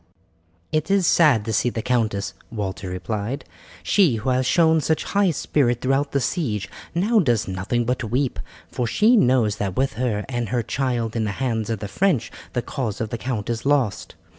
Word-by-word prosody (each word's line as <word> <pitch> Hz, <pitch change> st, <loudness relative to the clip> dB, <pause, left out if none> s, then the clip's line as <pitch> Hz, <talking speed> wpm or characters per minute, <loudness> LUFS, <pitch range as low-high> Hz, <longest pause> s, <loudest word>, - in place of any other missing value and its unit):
"It 155 Hz, +2 st, 0 dB
is 195 Hz, -2 st, +3 dB
sad 145 Hz, -11 st, +4 dB
to 110 Hz, -, -2 dB
see 115 Hz, +3 st, +2 dB
the 115 Hz, -2 st, -4 dB
countess," 110 Hz, -5 st, 0 dB, 0.2 s
Walter 95 Hz, -4 st, -4 dB
replied; 105 Hz, +8 st, -4 dB, 0.4 s
"she 180 Hz, -, +3 dB
who 120 Hz, +4 st, -1 dB
has 130 Hz, 0 st, +1 dB
shown 160 Hz, -1 st, +4 dB
such 160 Hz, +2 st, 0 dB
high 200 Hz, -1 st, +2 dB
spirit 130 Hz, -6 st, +1 dB
throughout 135 Hz, +3 st, 0 dB
the 140 Hz, -, +1 dB
siege 125 Hz, -, -1 dB, 0.3 s
now 215 Hz, +6 st, +3 dB
does 120 Hz, -, +1 dB
nothing 95 Hz, +6 st, -1 dB
but 125 Hz, 0 st, -1 dB
weep, 130 Hz, +3 st, 0 dB, 0.3 s
for 125 Hz, -, -2 dB
she 215 Hz, -, +4 dB
knows 125 Hz, -, +3 dB
that 95 Hz, -3 st, -2 dB
with 135 Hz, +1 st, +1 dB
her 110 Hz, -5 st, -1 dB
and 120 Hz, -4 st, -3 dB
her 120 Hz, 0 st, 0 dB
child 120 Hz, -2 st, -1 dB
in 110 Hz, -1 st, 0 dB
the 105 Hz, -, -2 dB
hands 115 Hz, -4 st, -1 dB
of 110 Hz, -3 st, -2 dB
the 105 Hz, -, -3 dB
French 155 Hz, -, 0 dB, 0.2 s
the 120 Hz, -, -1 dB
cause 115 Hz, -8 st, -3 dB
of 110 Hz, -2 st, -3 dB
the 120 Hz, -, -3 dB
count 115 Hz, -4 st, -3 dB
is 115 Hz, -1 st, -2 dB
lost. 135 Hz, -7 st, 0 dB
120 Hz, 190 wpm, -23 LUFS, 110-140 Hz, 0.4 s, sad